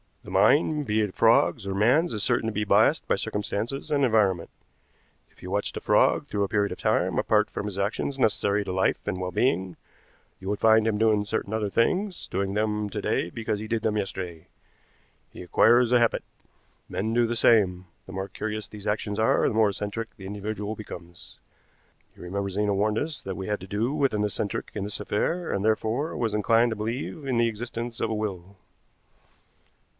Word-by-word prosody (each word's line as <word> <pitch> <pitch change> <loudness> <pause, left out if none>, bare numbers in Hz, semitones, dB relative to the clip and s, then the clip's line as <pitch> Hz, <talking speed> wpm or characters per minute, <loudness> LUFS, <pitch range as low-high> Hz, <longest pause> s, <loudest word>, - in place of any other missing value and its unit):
The - - -10
mind, 150 0 +3
be 110 -1 +1
it 105 -3 -2
frog's 115 -2 +3
or 95 - -2
man's, 130 - +3
is 105 - -2
certain 120 -2 +1
to 110 - -2
be 105 - -1
biased 105 - +3
by - - +3
circumstances 110 +8 -3
and 145 -1 +2
environment. 100 -7 +2 0.8
If - - -25
you - - -6
watched - - -2
a - - -5
frog - - +3
through 100 - -1
a - - 0
period 100 0 0
of - - -6
time, - - +1
apart - - +2
from - - -4
his 100 -2 -4
actions 105 +7 -2
necessary 105 -4 +1
to 95 - -3
life 95 +1 0
and 90 - -2
well 90 0 -3
being, 95 -5 0 0.6
you 95 - -9
would 105 - -1
find 110 0 +5
him 110 -2 +1
doing 105 -1 +2
certain 105 0 -3
other 110 -2 -1
things, 180 - 0
doing 95 +1 -2
them 105 0 -1
to - - -3
day 85 - 0
because 110 0 -3
he 110 - -6
did 115 0 -1
them 105 -1 +1
yesterday. 90 -5 -5 0.8
He - - -9
acquires 120 +6 +4
a 125 - +5
habit. 115 -1 +1 0.7
Men 110 +4 -2
do 120 0 +3
the 120 - -2
same. 95 -6 +3 0.2
The - - -9
more 95 +1 -3
curious 110 +1 -5
these 105 -1 -10
actions 105 0 -1
are, 110 - +3
the - - -1
more 110 -2 +4
eccentric 105 +3 -5
the 95 - -10
individual 105 +1 -4
becomes. 90 -5 -11 0.8
You - - -12
remember 100 +2 -3
Zena 100 +1 0
warned 105 +2 +1
us 150 +4 -3
that 95 -1 -5
we 95 - -5
had 105 -1 -1
to 95 - -10
do 110 +7 -1
with 140 -5 +1
an 105 0 0
eccentric 105 0 -3
in 105 - -3
this 105 +1 -4
affair, 165 +12 -1
and 100 - -1
therefore 110 +7 0
was 115 -3 -1
inclined 115 +3 +3
to - - -2
believe 120 +7 -4
in 130 -3 0
the 115 0 +3
existence 115 +1 -5
of 115 - 0
a 110 - -1
will." 100 -3 -4
105 Hz, 200 wpm, -26 LUFS, 100-115 Hz, 0.8 s, find